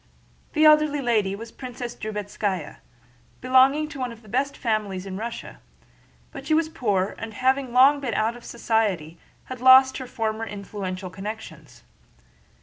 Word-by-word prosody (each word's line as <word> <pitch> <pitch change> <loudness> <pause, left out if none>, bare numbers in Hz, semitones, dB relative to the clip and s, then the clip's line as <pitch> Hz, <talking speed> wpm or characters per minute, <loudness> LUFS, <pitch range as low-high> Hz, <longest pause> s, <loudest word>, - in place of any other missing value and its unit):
The 310 0 +3
elderly 305 -1 +5
lady 215 -7 +1
was 225 +2 -9
a - - -28
Princess 245 -2 -7
Drubetskáya, 205 -5 -4 0.6
belonging 260 +4 +4
to 280 - -9
one 250 -2 -2
of 230 0 -13
the - - -17
best 270 +5 -1
families 210 -5 -2
in 190 -1 -6
Russia, 230 +4 -6 0.7
but 275 -2 -9
she 310 - +3
was 320 0 +1
poor, 205 -10 -1
and 225 -1 -7
having 260 +1 +1
long 270 +4 +6
been 255 -5 -3
out 225 +2 0
of 240 - -13
society 200 -9 -1 0.2
had 255 -2 -9
lost 260 +1 +7
her 260 - -7
former 220 -1 -3
influential 195 -2 -6
connections. 210 +4 -9
235 Hz, 155 wpm, -24 LUFS, 205-260 Hz, 0.7 s, lost